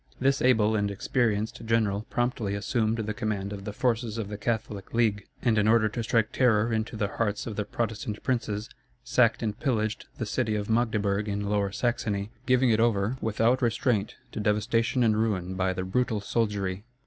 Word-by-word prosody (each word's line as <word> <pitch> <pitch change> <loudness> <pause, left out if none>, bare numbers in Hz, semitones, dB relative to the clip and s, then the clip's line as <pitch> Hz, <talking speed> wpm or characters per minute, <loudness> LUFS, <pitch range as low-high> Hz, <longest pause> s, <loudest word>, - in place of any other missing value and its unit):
This 135 +2 +2
able 110 -5 +4
and 105 -1 +1
experienced 110 +2 -1
general 110 -2 +1
promptly 120 -4 -1
assumed 110 +2 0
the 110 -1 -2
command 105 -2 -2
of 100 -1 -8
the 105 - -3
forces 115 0 -1
of 105 -3 -3
the 105 - -4
Catholic 110 -2 -3
League, 105 -4 +1 0.2
and 115 -4 +3
in 105 - +2
order 110 -1 +5
to 115 - -3
strike 115 0 +1
terror 115 -3 +3
into 110 +1 -2
the 105 -2 0
hearts 105 0 -2
of 110 - -5
the 105 - -2
Protestant 110 -1 -3
princes, 110 -5 -1 0.4
sacked 120 -1 +3
and 110 0 -2
pillaged 110 -7 -1
the 115 - -2
city 110 0 0
of 105 +1 -2
Magdeburg 105 -3 +1
in 100 0 -2
Lower 100 -1 +1
Saxony, 105 -2 -1 0.2
giving 130 -1 +4
it 110 - +3
over 115 +1 +2
without 115 +3 +2
restraint 115 -3 +1 0.2
to - - -5
devastation 115 +4 +1
and 110 -2 +3
ruin 95 -5 -1
by 95 0 0
the 95 0 -3
brutal 110 +3 0
soldiery. 100 -3 -1
110 Hz, 185 wpm, -27 LUFS, 105-115 Hz, 0.4 s, order